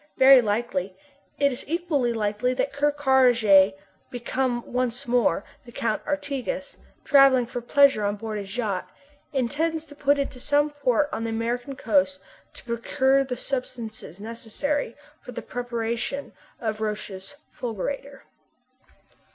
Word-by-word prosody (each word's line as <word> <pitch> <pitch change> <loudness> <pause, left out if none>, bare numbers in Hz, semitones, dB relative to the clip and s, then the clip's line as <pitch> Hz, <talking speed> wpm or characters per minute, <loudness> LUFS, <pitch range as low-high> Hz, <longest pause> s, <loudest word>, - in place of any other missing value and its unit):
Very 265 -1 +8
likely. 205 -4 -2 0.4
It 280 -1 +3
is 245 - -4
equally 315 -7 0
likely 215 +2 0
that 270 +2 -1
Ker 290 +1 +2
Karraje, 245 -9 +5 0.3
become 245 0 -2
once 250 +1 -2
more 235 -6 +2 0.2
the 240 - -13
Count 225 -2 -2
d'Artigas, 285 -2 -3 0.3
travelling 275 -3 +6
for 240 +1 -5
pleasure 275 -2 +4
on 205 0 0
board 215 0 -5
his 200 +3 -7
yacht, 205 -6 -2 0.4
intends 310 +5 -1
to 295 - -13
put 285 0 +2
into 275 -2 -3
some 290 +3 +2
port 285 -1 +1
on 225 - -3
the - - -2
American 240 +4 -2
coast 190 -6 +1 0.4
to - - -11
procure 260 +3 +2
the 255 -2 -4
substances 225 - -5
necessary 230 +5 -3 0.3
to - - -7
the - - -6
preparation 240 +2 -3 0.3
of 220 -2 -3
Roch's 210 0 -4 0.2
fulgurator. 270 +5 -5
245 Hz, 135 wpm, -25 LUFS, 220-275 Hz, 0.4 s, Very